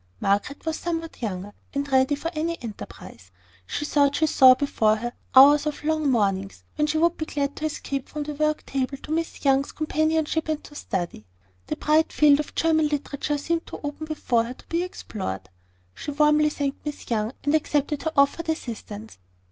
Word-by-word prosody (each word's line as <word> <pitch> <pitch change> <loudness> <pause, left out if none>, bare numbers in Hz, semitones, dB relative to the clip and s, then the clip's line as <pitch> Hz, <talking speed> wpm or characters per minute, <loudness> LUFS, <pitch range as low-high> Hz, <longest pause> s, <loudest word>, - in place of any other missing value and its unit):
Margaret 205 +10 0
was 320 -1 -2
somewhat 330 -3 -4
younger, 205 -2 -4 0.2
and 280 0 -1
ready 265 +2 +4
for 330 +4 -4
any 335 +2 -2
enterprise. 205 - -9 0.4
She 295 - -3
thought 285 -1 +3
she 315 - +3
saw 260 -4 +7
before 225 -6 +2
her 240 +2 -4 0.2
hours 290 +3 +8
of 300 - -4
long 310 -1 +1
mornings, 195 -5 0
when 300 0 +1
she 310 +1 0
should 340 +2 +2
be 315 - -4
glad 285 -1 -2
to 310 - -3
escape 275 -3 -4
from 300 -1 -4
the 300 +1 -5
work 305 +1 0
table 270 0 -2
to 300 - -10
Miss 325 -1 -2
Young's 275 0 +3
companionship 315 0 0
and 310 -1 -1
to - - -13
study. 175 - -4 0.4
The - - -2
bright 310 +1 +2
field 290 -1 +5
of 300 - -5
German 315 -2 +3
literature 295 0 -2
seemed 330 +3 -2
to - - -7
open 295 +2 -5
before 245 -7 +1
her 245 +2 -7
to - - -19
be 335 +1 0
explored. 195 - -5 0.5
She - - -7
warmly 300 +1 +4
thanked 285 -2 -3
Miss 295 -1 -6
Young, 220 +1 0
and 290 - +1
accepted 295 -1 +1
her 320 - -1
offered 280 +4 +3
assistance. 225 - -5
290 Hz, 190 wpm, -25 LUFS, 255-310 Hz, 0.5 s, hours